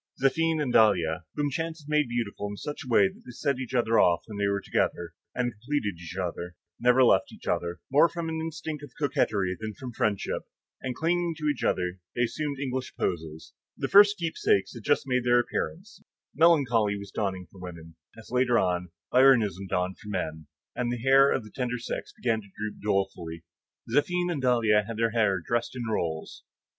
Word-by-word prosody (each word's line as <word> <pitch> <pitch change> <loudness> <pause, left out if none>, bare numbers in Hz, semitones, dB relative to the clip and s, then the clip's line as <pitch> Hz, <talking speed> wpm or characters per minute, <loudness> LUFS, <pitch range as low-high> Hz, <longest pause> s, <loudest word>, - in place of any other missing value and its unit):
Zéphine 160 +4 +2
and 135 -5 -1
Dahlia, 90 -6 +3
whom 145 -1 0
chance 160 +3 -3
had - - -17
made 150 -2 +2
beautiful 115 -4 -3
in 100 - -7
such 150 +7 -6
a - - -12
way 100 -4 +6
that - - -12
they - - -13
set 130 +2 -1
each 130 0 -5
off 110 -8 +3
when 105 -2 -8
they 100 - +2
were 100 0 +1
together, 85 -3 -1 0.2
and 125 -1 0
completed 110 - -3
each 85 0 -8
other, 90 -1 -4 0.2
never 125 +2 +5
left 95 -6 +4
each - - -14
other, 85 -1 -1
more 150 +5 +6
from 170 -1 -4
an 160 0 -3
instinct 160 -2 -5
of 145 - -11
coquetry 110 -10 0
than 110 -1 -5
from 130 -3 -7
friendship, 105 -3 -1 0.4
and 130 -1 -3
clinging 170 +2 0
to 155 - -5
each 145 -5 -1
other, 90 0 0 0.2
they 120 - +2
assumed 145 +4 -2
English 130 -1 -3
poses; 80 -3 -4 0.2
the - - -2
first 205 +1 +7
keepsakes 165 - +1
had 120 - -9
just - - +1
made 125 -2 +1
their 120 0 +4
appearance, 190 - -4 0.3
melancholy 125 -11 +4
was 100 0 -9
dawning 95 -3 -2
for 95 - -15
women, 85 -2 -9 0.2
as 115 - -13
later 125 -1 +3
on, 90 -3 0 0.2
Byronism 115 -8 +4
dawned 90 +1 -1
for 105 - -10
men; 80 -6 -4 0.3
and 120 -1 -1
the 120 - -2
hair 135 +3 +5
of 130 - 0
the 105 - -13
tender 125 -1 -2
sex 120 - -5
began 115 -3 -1
to 100 - -16
droop 105 0 -5
dolefully. 90 -5 -2 0.5
Zéphine 175 +5 +2
and 150 -5 -2
Dahlia 115 -4 +3
had 115 -1 -5
their 115 0 +1
hair 105 -5 +2
dressed 120 +2 -1
in 125 - -4
rolls. 80 -7 -3
120 Hz, 195 wpm, -27 LUFS, 95-140 Hz, 0.5 s, first